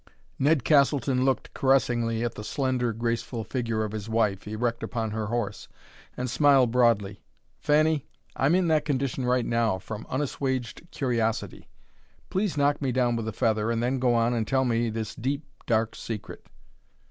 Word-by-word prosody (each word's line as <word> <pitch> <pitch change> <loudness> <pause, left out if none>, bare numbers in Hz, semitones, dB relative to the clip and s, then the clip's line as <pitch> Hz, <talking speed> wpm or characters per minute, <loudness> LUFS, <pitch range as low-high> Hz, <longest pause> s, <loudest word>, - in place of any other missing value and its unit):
Ned 145 -1 +3
Castleton 140 -3 +3
looked 135 -1 0
caressingly 120 -4 +1
at 120 - -2
the 105 - -8
slender, 130 -1 0
graceful 115 +1 -2
figure 115 -2 -2
of 105 - -3
his 110 0 -6
wife, 105 -3 0
erect 115 +2 -2
upon 110 -2 -3
her 110 0 -3
horse, 105 -2 -3 0.5
and 125 - -2
smiled 135 -1 +4
broadly. 110 -6 +2 0.4
"Fanny, 155 0 +2 0.3
I'm 140 +6 +3
in 185 -1 +2
that 155 -2 +3
condition 135 -3 -1
right 125 -1 +2
now, 115 -4 +1
from 105 +4 -8
unassuaged 130 +1 -3
curiosity. 115 -5 -2 0.6
Please 190 -4 0
knock 145 +1 +2
me 135 -2 0
down 120 -1 +1
with 115 -1 -3
a - - -1
feather 110 0 0
and 115 0 0
then 130 +2 0
go 125 -1 +2
on 115 +1 +2
and 115 -2 -1
tell 130 -1 +2
me 115 -1 +1
this 110 -1 -4
deep, 140 +5 -2 0.2
dark 115 -1 +1
secret." 110 -3 -7
120 Hz, 165 wpm, -26 LUFS, 115-135 Hz, 0.6 s, smiled